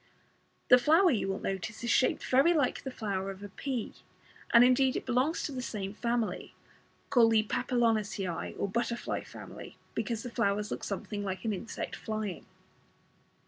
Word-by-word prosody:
The 250 Hz, -, +9 dB
flower, 325 Hz, +8 st, +5 dB
you 220 Hz, -6 st, 0 dB
will 195 Hz, 0 st, -1 dB
notice, 195 Hz, +5 st, -4 dB
is 235 Hz, -, 0 dB
shaped 255 Hz, -, +2 dB
very 275 Hz, +7 st, +4 dB
like 285 Hz, -5 st, +1 dB
the 265 Hz, -, -5 dB
flower 200 Hz, -6 st, -3 dB
of 195 Hz, +1 st, -8 dB
a 205 Hz, -, -7 dB
pea, 250 Hz, +3 st, -4 dB, 0.6 s
and 235 Hz, -, +8 dB
indeed 255 Hz, +1 st, +4 dB
it -, -, -3 dB
belongs 260 Hz, +7 st, +1 dB
to -, -, -3 dB
the 260 Hz, -2 st, -4 dB
same 200 Hz, -5 st, -4 dB
family, 235 Hz, 0 st, -2 dB, 0.6 s
called 230 Hz, -4 st, +5 dB
the 215 Hz, -1 st, +4 dB
Papilionaceae 220 Hz, -6 st, 0 dB
or -, -, -1 dB
butterfly 235 Hz, +3 st, -2 dB
family, -, -, -10 dB, 0.2 s
because 230 Hz, -3 st, -2 dB
the 245 Hz, -, -6 dB
flowers 210 Hz, -2 st, 0 dB
look -, -, -4 dB
something 205 Hz, +1 st, -4 dB
like 190 Hz, +2 st, -4 dB
an 220 Hz, -, +1 dB
insect 215 Hz, +4 st, -5 dB
flying. 215 Hz, -4 st, -4 dB
230 Hz, 165 wpm, -30 LUFS, 205-250 Hz, 0.6 s, The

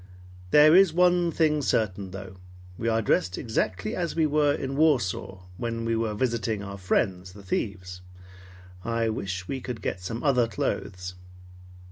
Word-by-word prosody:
There 150 Hz, -, +7 dB
is 190 Hz, -3 st, +6 dB
one 175 Hz, -1 st, +4 dB
thing 155 Hz, -2 st, +2 dB
certain 100 Hz, -7 st, 0 dB
though. 95 Hz, 0 st, -9 dB, 0.4 s
We 115 Hz, -, -4 dB
are 115 Hz, 0 st, +1 dB
dressed 90 Hz, -2 st, +1 dB
exactly 95 Hz, -4 st, -2 dB
as 175 Hz, -2 st, -2 dB
we 160 Hz, -1 st, +3 dB
were 150 Hz, -1 st, +3 dB
in 135 Hz, -1 st, -3 dB
Warsaw, 120 Hz, -, +1 dB
when 115 Hz, +1 st, -3 dB
we 115 Hz, 0 st, +1 dB
were 110 Hz, -2 st, -1 dB
visiting 115 Hz, -3 st, -1 dB
our 100 Hz, 0 st, -7 dB
friends, 90 Hz, 0 st, -1 dB
the 100 Hz, 0 st, -13 dB
thieves. 90 Hz, -2 st, -4 dB, 0.8 s
I 115 Hz, 0 st, 0 dB
wish 95 Hz, -4 st, -4 dB
we 135 Hz, -1 st, -4 dB
could 125 Hz, -3 st, -5 dB
get 95 Hz, -, -3 dB
some 115 Hz, +6 st, -5 dB
other 125 Hz, -5 st, +3 dB
clothes." 90 Hz, -3 st, -3 dB
115 Hz, 155 wpm, -26 LUFS, 95-140 Hz, 0.8 s, There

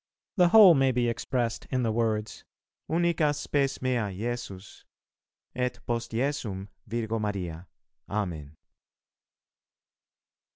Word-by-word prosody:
The 180 Hz, -4 st, +5 dB
whole 195 Hz, -1 st, +9 dB
may 135 Hz, -3 st, +3 dB
be 120 Hz, -1 st, +1 dB
expressed 120 Hz, 0 st, -2 dB
in 130 Hz, -2 st, 0 dB
the 115 Hz, -, +1 dB
words, 110 Hz, -1 st, -1 dB, 0.5 s
"Unica 165 Hz, -3 st, +2 dB
spes 140 Hz, -2 st, -1 dB
mea 120 Hz, -5 st, 0 dB
Jesus, 105 Hz, -1 st, -6 dB, 0.7 s
et 125 Hz, 0 st, -2 dB
post 120 Hz, 0 st, -2 dB
Jesum 115 Hz, -6 st, -2 dB, 0.2 s
Virgo 115 Hz, 0 st, -2 dB
Maria. 90 Hz, -5 st, -4 dB, 0.4 s
Amen." 85 Hz, -8 st, -4 dB
120 Hz, 100 wpm, -28 LUFS, 105-135 Hz, 0.7 s, whole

